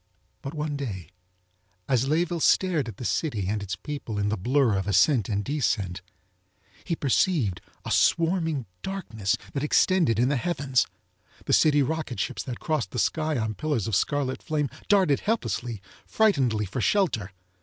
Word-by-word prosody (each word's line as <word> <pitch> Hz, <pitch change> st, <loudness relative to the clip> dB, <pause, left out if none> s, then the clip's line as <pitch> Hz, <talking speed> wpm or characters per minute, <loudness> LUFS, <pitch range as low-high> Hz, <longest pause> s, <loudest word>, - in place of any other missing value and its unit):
But 140 Hz, +4 st, -6 dB
one 150 Hz, -1 st, -2 dB
day 105 Hz, -11 st, -5 dB, 0.8 s
as 130 Hz, 0 st, +2 dB
Layeville 170 Hz, +3 st, +1 dB
stared 170 Hz, -8 st, +3 dB
at 110 Hz, -5 st, -8 dB
the 125 Hz, -, -6 dB
city 110 Hz, -, -1 dB
and 105 Hz, +1 st, -1 dB
its 95 Hz, -3 st, -4 dB
people 115 Hz, +1 st, -6 dB
in 100 Hz, 0 st, 0 dB
the 110 Hz, -, 0 dB
blur 125 Hz, +2 st, +2 dB
of 95 Hz, 0 st, -2 dB
ascent 105 Hz, -, +3 dB
and 100 Hz, -1 st, -1 dB
descent, 105 Hz, -11 st, -1 dB, 0.8 s
he 170 Hz, -, -2 dB
perceived 135 Hz, -, +1 dB, 0.2 s
a -, -, -4 dB
swarming 165 Hz, -5 st, +2 dB, 0.2 s
darkness 115 Hz, -, -2 dB, 0.2 s
that 140 Hz, -, -2 dB
extended 155 Hz, -, +3 dB
in 120 Hz, +2 st, +3 dB
the 145 Hz, -, +1 dB
heavens. 140 Hz, -4 st, 0 dB, 0.6 s
The -, -, 0 dB
city 145 Hz, -2 st, +5 dB
rocket 155 Hz, -3 st, -3 dB
ships -, -, -2 dB
that 125 Hz, -3 st, -5 dB
crossed 150 Hz, -, -1 dB
the -, -, -7 dB
sky 155 Hz, -2 st, 0 dB
on 110 Hz, -2 st, -1 dB
pillars 145 Hz, -3 st, -1 dB
of 110 Hz, -, 0 dB
scarlet 140 Hz, +3 st, 0 dB
flame 150 Hz, -3 st, -1 dB, 0.2 s
darted 190 Hz, -9 st, +4 dB
helplessly, 120 Hz, -, -2 dB, 0.2 s
frightenedly 135 Hz, -, +2 dB
for 100 Hz, +7 st, -4 dB
shelter. 115 Hz, -, +1 dB
135 Hz, 160 wpm, -26 LUFS, 110-155 Hz, 0.8 s, city